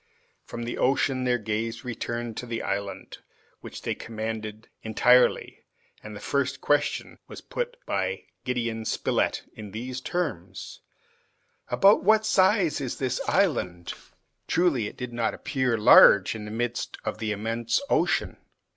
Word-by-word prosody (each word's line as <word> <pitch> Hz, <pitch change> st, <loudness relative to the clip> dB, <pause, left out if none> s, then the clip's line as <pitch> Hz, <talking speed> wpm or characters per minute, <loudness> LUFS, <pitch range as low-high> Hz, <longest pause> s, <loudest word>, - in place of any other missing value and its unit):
From 120 Hz, -, -6 dB
the 120 Hz, -, -4 dB
ocean 130 Hz, -1 st, +1 dB
their 125 Hz, -1 st, +2 dB
gaze 115 Hz, +2 st, -3 dB
returned 120 Hz, -1 st, -4 dB
to 125 Hz, -, -5 dB
the 115 Hz, -1 st, -3 dB
island 100 Hz, 0 st, -4 dB, 0.4 s
which -, -, -10 dB
they -, -, -1 dB
commanded 110 Hz, -1 st, -6 dB
entirely, 125 Hz, +3 st, +3 dB, 0.4 s
and 105 Hz, 0 st, -9 dB
the -, -, -7 dB
first 140 Hz, +2 st, -1 dB
question 145 Hz, 0 st, 0 dB
was -, -, -9 dB
put -, -, -4 dB
by 485 Hz, -, -2 dB, 0.2 s
Gideon 115 Hz, -3 st, -2 dB
Spilett -, -, 0 dB
in 105 Hz, -2 st, -9 dB
these 125 Hz, +5 st, -5 dB
terms: 155 Hz, -, -4 dB, 0.9 s
"About 200 Hz, +2 st, +5 dB
what 220 Hz, +2 st, +4 dB
size 190 Hz, -7 st, +3 dB
is 130 Hz, -3 st, -4 dB
this 130 Hz, -1 st, -1 dB
island?" 90 Hz, -, 0 dB, 0.5 s
Truly, 155 Hz, -11 st, +2 dB
it -, -, -10 dB
did 125 Hz, -1 st, -6 dB
not 115 Hz, -1 st, -1 dB
appear 130 Hz, -4 st, -1 dB
large 105 Hz, -3 st, +7 dB
in 110 Hz, -2 st, -7 dB
the -, -, -7 dB
midst 120 Hz, +2 st, -3 dB
of 110 Hz, -, -3 dB
the 110 Hz, -1 st, -2 dB
immense 115 Hz, +3 st, -1 dB
ocean. -, -, +1 dB
120 Hz, 140 wpm, -26 LUFS, 110-135 Hz, 0.9 s, large